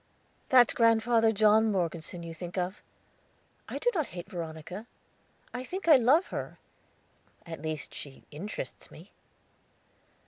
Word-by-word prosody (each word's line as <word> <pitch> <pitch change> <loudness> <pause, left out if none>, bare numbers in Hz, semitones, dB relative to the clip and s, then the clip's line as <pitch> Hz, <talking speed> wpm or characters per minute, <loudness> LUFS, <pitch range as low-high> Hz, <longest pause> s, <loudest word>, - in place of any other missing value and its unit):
"That's 250 -2 +6
Grandfather 230 0 +4
John 215 +1 +4
Morgeson 170 -2 -2
you 165 -1 -6
think 175 +2 -7
of. 180 +2 -2 0.9
I - - -4
do 485 - +1
not 315 -6 0
hate 175 0 -8
Veronica. 170 +4 -6 0.7
I 250 0 -4
think 365 +7 -6
I 315 - +9
love 270 - +4
her; - - -5 0.9
at 165 -3 -7
least 155 -1 -4
she 135 -2 -9
interests 185 +8 -6
me." - - -14
205 Hz, 130 wpm, -29 LUFS, 170-235 Hz, 0.9 s, I